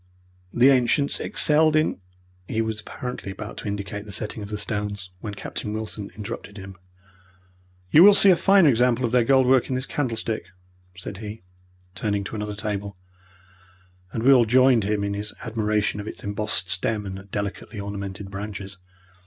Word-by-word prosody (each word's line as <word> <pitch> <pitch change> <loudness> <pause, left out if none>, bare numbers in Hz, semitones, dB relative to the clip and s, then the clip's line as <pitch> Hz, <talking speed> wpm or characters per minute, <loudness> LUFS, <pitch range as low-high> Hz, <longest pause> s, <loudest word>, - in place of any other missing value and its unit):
The 125 +3 +5
ancients 135 +2 +2
excelled 155 +1 +3
in 155 -8 +1 0.2
" 90 0 -34
he 110 - -2
was 110 -1 -2
apparently 125 -6 -6
about 105 +2 -8
to - - -6
indicate 100 0 -4
the 105 - -9
setting 105 +2 -3
of 100 - -7
the 105 - -3
stones, 105 -3 -4
when 105 0 -6
Captain 105 +1 -5
Wilson 110 -2 -5
interrupted 105 0 -7
him. 95 -1 -9 1.2
"You 155 - +8
will 200 +2 +9
see 200 - +7
a - - +6
finer 195 -1 +5
example 125 -1 +3
of 115 - -2
their 125 -1 +4
gold 130 +2 +4
work 130 0 +3
in 130 - -1
this 130 +1 -2
candlestick," 115 -8 -3 0.5
said 95 +1 -7
he, 105 -1 -8 0.5
turning 100 +2 -1
to 100 - -6
another 105 -1 -4
table, 100 -2 -4 1.1
and 110 - -3
we 135 +2 +7
all 125 -3 +5
joined 125 -2 +5
him 105 0 0
in 100 0 -1
his 105 +1 -5
admiration 110 -2 -1
of 105 - -6
its - - -8
embossed 105 -2 -1
stem 100 +4 0
and 95 0 -8
delicately 100 +2 -5
ornamented 100 0 -6
branches. 100 -1 -7
105 Hz, 175 wpm, -24 LUFS, 100-125 Hz, 1.2 s, will